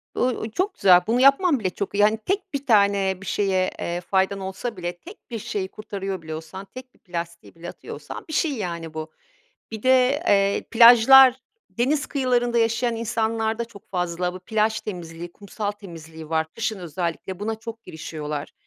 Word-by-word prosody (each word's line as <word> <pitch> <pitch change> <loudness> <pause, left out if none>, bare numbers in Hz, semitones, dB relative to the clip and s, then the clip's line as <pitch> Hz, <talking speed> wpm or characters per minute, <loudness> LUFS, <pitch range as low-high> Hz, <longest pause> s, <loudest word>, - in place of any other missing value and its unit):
Iıı, - - 0
ııı, 220 - -5
çok 375 - -1
güzel, 180 -2 +6
bunu 235 +3 +2
yapman 275 +3 +5
bile 190 -4 -1
çok 195 +2 -5
iyi. 205 - +4
Hani, 215 +1 +4
tek 375 - -3
1 280 0 -3
tane 200 -5 +3
bir - - -9
şeye, 190 -3 +1
eee, 175 +1 -3
faydan 190 +2 0
olsa 190 +5 -5
bile, 175 0 -4
tek 375 - -15
1 230 - -3
şeyi 195 -2 -3
kurtarıyor 195 -3 -5
bile 160 -1 -6
olsan, 165 +5 -9
tek 255 0 -10
1 - - -29
plastiği 170 -3 -7
bile 165 +1 -8
atıyor - - -9
olsan - - -9
bir - - -6
şey, 310 0 +1
yani, 170 -6 -5
bu. 155 0 -6 0.6
Bir 220 -1 -7
de, 260 +4 +3
eee, 200 0 +2
plajlar, 245 +3 +8 0.3
deniz 275 +5 0
kıyılarında 245 -3 0
yaşayan 230 +1 +1
insanlarda 225 0 -1
çok 220 -4 -16
fazla 180 -1 -2
bu 185 - -8
plaj 215 +3 0
temizliği, 170 -3 -7
kumsal 205 +2 -5
temizliği 165 -6 -11
var. 160 0 0
Kışın 220 -3 -2
özellikle 175 +2 -4
buna 220 +2 -2
çok 225 +1 -9
girişiyorlar. 150 -2 -6
205 Hz, 180 wpm, -23 LUFS, 180-235 Hz, 0.6 s, plajlar